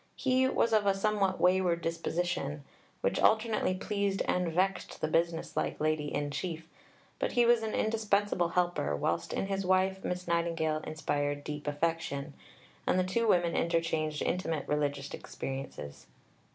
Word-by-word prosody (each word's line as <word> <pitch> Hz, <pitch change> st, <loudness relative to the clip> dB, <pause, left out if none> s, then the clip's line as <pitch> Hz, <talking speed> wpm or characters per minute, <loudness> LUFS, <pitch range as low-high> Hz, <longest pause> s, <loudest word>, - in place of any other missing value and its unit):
He 260 Hz, 0 st, +2 dB
was 230 Hz, -3 st, +1 dB
of 210 Hz, -2 st, +3 dB
a 195 Hz, -, +4 dB
somewhat 195 Hz, -1 st, +1 dB
wayward 180 Hz, -2 st, +3 dB
disposition, 165 Hz, -3 st, -2 dB, 0.4 s
which -, -, +1 dB
alternately 220 Hz, -4 st, +3 dB
pleased 200 Hz, 0 st, -1 dB
and 180 Hz, -2 st, +1 dB
vexed 190 Hz, +3 st, 0 dB
the -, -, 0 dB
business 165 Hz, +1 st, 0 dB
like -, -, -1 dB
Lady 155 Hz, -1 st, 0 dB
in 145 Hz, 0 st, -2 dB
Chief, 160 Hz, +1 st, -4 dB, 0.5 s
but -, -, -1 dB
he 240 Hz, -1 st, +4 dB
was 235 Hz, -1 st, +5 dB
an 220 Hz, -1 st, -2 dB
indispensable 205 Hz, -4 st, +1 dB
helper, 175 Hz, -, 0 dB
whilst 85 Hz, +3 st, -1 dB
in -, -, -1 dB
his 195 Hz, 0 st, -2 dB
wife 190 Hz, +1 st, +2 dB
Miss 180 Hz, 0 st, -3 dB
Nightingale 165 Hz, -2 st, 0 dB
inspired 145 Hz, -2 st, -2 dB
deep 150 Hz, 0 st, -6 dB
affection, 145 Hz, -1 st, -1 dB, 0.5 s
and -, -, +3 dB
the 185 Hz, -, +3 dB
two 225 Hz, +5 st, 0 dB
women 175 Hz, -4 st, +3 dB
interchanged 165 Hz, -2 st, 0 dB
intimate 165 Hz, -5 st, -1 dB
religious 145 Hz, -1 st, -1 dB
experiences. 135 Hz, -, -6 dB
170 Hz, 150 wpm, -31 LUFS, 150-195 Hz, 0.5 s, was